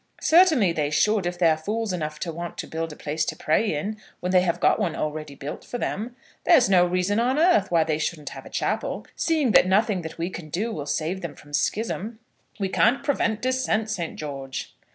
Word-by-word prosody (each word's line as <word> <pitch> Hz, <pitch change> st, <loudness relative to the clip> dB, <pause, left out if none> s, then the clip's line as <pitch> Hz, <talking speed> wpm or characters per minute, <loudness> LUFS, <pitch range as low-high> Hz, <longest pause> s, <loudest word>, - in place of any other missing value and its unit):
"Certainly 315 Hz, -, +5 dB
they 150 Hz, -3 st, -1 dB
should, 200 Hz, +4 st, +2 dB
if 175 Hz, 0 st, -3 dB
they're 165 Hz, -3 st, +4 dB
fools 210 Hz, +6 st, -3 dB
enough 155 Hz, -3 st, -3 dB
to 170 Hz, -, -2 dB
want 170 Hz, +1 st, -6 dB
to -, -, -4 dB
build 165 Hz, 0 st, -4 dB
a -, -, -9 dB
place 150 Hz, +2 st, -2 dB
to -, -, -3 dB
pray 205 Hz, +8 st, +1 dB
in, 205 Hz, +9 st, -3 dB, 0.2 s
when 180 Hz, -, -2 dB
they 185 Hz, -1 st, +5 dB
have 175 Hz, -1 st, 0 dB
got -, -, +3 dB
one 180 Hz, -7 st, -1 dB
already 155 Hz, -1 st, -4 dB
built 140 Hz, +2 st, -7 dB
for 245 Hz, -, -5 dB
them. 235 Hz, +1 st, -3 dB, 0.3 s
There's 300 Hz, -, +6 dB
no 185 Hz, -2 st, +5 dB
reason 185 Hz, +4 st, +1 dB
on 250 Hz, +4 st, +1 dB
earth 320 Hz, -, +4 dB
why 170 Hz, -2 st, +4 dB
they 155 Hz, -1 st, -1 dB
shouldn't 155 Hz, -1 st, -3 dB
have -, -, -9 dB
a -, -, -11 dB
chapel, -, -, -2 dB
seeing 310 Hz, -7 st, +1 dB
that 185 Hz, -, +6 dB
nothing 200 Hz, 0 st, +2 dB
that 160 Hz, -1 st, -8 dB
we 170 Hz, +2 st, -3 dB
can 165 Hz, -4 st, -8 dB
do 210 Hz, +9 st, -2 dB
will 145 Hz, -7 st, -5 dB
save 155 Hz, +6 st, -2 dB
them 160 Hz, -4 st, -6 dB
from 145 Hz, 0 st, -16 dB
schism." 220 Hz, +5 st, -1 dB, 0.4 s
"We 195 Hz, -, 0 dB
can't 225 Hz, +7 st, +2 dB
prevent 230 Hz, -6 st, 0 dB
dissent, 255 Hz, -4 st, 0 dB
Saint 175 Hz, -6 st, -3 dB
George." 135 Hz, -3 st, -6 dB
180 Hz, 215 wpm, -25 LUFS, 155-220 Hz, 0.4 s, There's